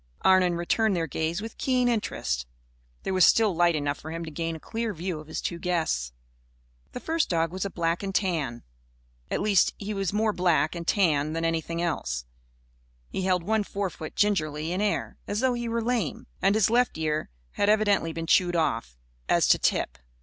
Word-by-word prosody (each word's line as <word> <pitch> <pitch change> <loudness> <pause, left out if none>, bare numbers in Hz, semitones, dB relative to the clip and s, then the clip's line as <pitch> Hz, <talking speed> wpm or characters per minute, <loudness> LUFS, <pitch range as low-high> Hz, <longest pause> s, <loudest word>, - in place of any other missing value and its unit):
Arnon 185 -2 +5
returned 195 +5 +1
their 165 -2 0
gaze 160 +6 -2
with 225 - -8
keen 255 -2 +2
interest. 205 - -1 0.6
There 190 - -2
was 185 -1 +4
still 215 -2 +5
light 175 0 +3
enough 145 -1 -1
for 160 - -8
him 165 +1 -4
to 160 - -7
gain 165 +1 -3
a - - -8
clear 225 +3 -3
view 170 -1 -3
of 155 - -11
his 155 - -4
two 170 - -3
guests. 160 - -1 0.8
The - - -4
first 325 +4 0
dog 165 -1 +1
was 185 +2 -3
a - - -2
black 170 -2 -1
and 195 -1 -4
tan. 155 - -1 0.7
At - - -1
least, 200 -3 +3
he 210 +1 -4
was 195 -3 -1
more 215 +1 +1
black 175 -4 +2
and 170 -2 -6
tan 155 -7 +2
than 165 0 -1
anything 165 +1 -1
else. 60 - -2 0.8
He 190 - -3
held 180 -2 +2
one 215 +3 +1
forefoot 195 -6 -5
gingerly 160 -6 +1
in 185 +3 -1
air, 210 -1 -1
as 205 - -1
though 260 -1 +3
he 240 -1 -3
were 230 0 -1
lame. 230 - -1 0.2
And 195 +2 +3
his 220 -1 +3
left 245 -6 +2
ear 155 - -1 0.2
had 205 - +1
evidently 205 -5 +3
been 165 0 -4
chewed 175 +1 +3
off, 115 - -1 0.3
as - - +4
to - - +5
tip. - - 0
175 Hz, 195 wpm, -27 LUFS, 160-210 Hz, 0.8 s, Arnon